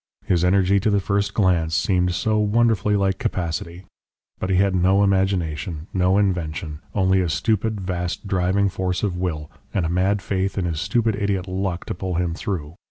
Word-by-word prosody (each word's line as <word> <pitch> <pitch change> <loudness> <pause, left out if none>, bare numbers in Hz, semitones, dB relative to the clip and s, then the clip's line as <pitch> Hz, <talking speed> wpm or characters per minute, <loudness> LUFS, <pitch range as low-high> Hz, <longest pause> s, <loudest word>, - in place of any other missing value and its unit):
His 90 -2 +2
energy 95 +1 +3
to 105 - +1
the 100 -1 +3
first 100 +1 -1
glance 85 -6 +2
seemed 90 -2 +1
so 110 -1 +1
wonderfully 105 -1 +2
like 95 -1 +1
capacity! 85 0 -3 0.6
But 95 - -3
he 95 - +2
had 95 +1 +3
no 95 +2 +3
imagination, 90 -5 0
no 95 +1 +2
invention, 85 -6 -1 0.2
only 95 -1 +3
a 90 - -1
stupid, 110 +4 0
vast, 90 +1 -3
driving 95 +1 +1
force 95 -1 -2
of 100 -4 0
will, 80 -5 -3 0.2
and 95 -5 +1
a - - -1
mad 95 +3 +1
faith 95 0 -1
in 95 - 0
his 80 -2 -2
stupid 110 +2 +1
idiot 100 -2 -1
'luck' 95 -1 -3
to - - -3
pull 95 0 -4
him 85 -1 0
through. 85 -4 -4
95 Hz, 180 wpm, -22 LUFS, 90-100 Hz, 0.6 s, energy